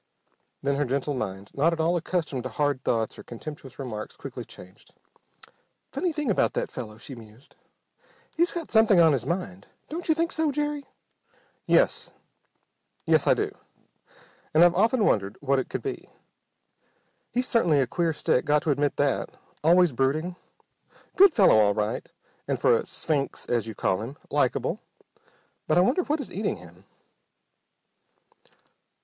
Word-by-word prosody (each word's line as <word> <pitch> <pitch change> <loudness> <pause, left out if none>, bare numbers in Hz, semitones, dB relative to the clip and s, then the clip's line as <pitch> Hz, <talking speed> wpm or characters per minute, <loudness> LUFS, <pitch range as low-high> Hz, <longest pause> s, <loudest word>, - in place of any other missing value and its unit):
Then 140 0 +1
her 145 - +1
gentle 140 +3 -1
mind, 100 -6 -5
not 160 +5 +2
at 165 - -5
all 165 +2 +2
accustomed 165 -6 -2
to 130 - -5
hard 140 +2 -1
thoughts 115 -2 -1
or - - -9
contemptuous 135 +2 -9
remarks, 120 -6 -6
quickly - - -7
changed. 95 +2 -16 1.0
"Funny 360 - -1
thing 295 -6 -1
about - - +2
that - - -2
fellow," 110 -4 -7
she 125 +4 -9
mused. 115 +1 -15 0.8
"He's 345 +1 +2
got 340 -3 -6
something 220 -4 +5
on 165 -3 +6
his 130 -2 -2
mind. 100 - -4 0.2
Don't 340 +2 -5
you 315 - +5
think 335 +1 0
so, 315 -2 0
Jerry?" 295 -1 -2 0.8
"Y - - +4
es, - - +2 1.0
yes - - +3
I - - +6
do. - - -1 1.0
And 160 - +7
I've 175 0 +6
often 220 +4 +3
wondered 100 -1 +1
what 140 -1 +1
it 130 - -4
could - - -4
be. 405 - -5 1.2
He 250 - 0
certainly's 170 - +3
a - - -1
queer 165 +7 0
stick. 150 -4 +1
Got 150 0 +2
to 155 - +1
admit 145 +1 0
that. 145 -1 0 0.3
Always 175 +1 +5
brooding. 145 +8 0 0.8
Good 390 0 +7
fellow 190 - +6
all 100 -1 +3
right, 105 0 -2 0.4
and, - - -1
for - - +4
a - - -2
'sphinx' 145 -4 -2
as 120 -2 -1
you 110 - -6
call 95 0 0
him, 125 +6 -7
likable. - - 0 0.9
But - - +2
I - - +7
wonder 250 - +3
what 310 -2 -1
is 280 - -7
eating 205 +2 -1
him?" 90 +2 -16
145 Hz, 160 wpm, -26 LUFS, 120-205 Hz, 1.2 s, And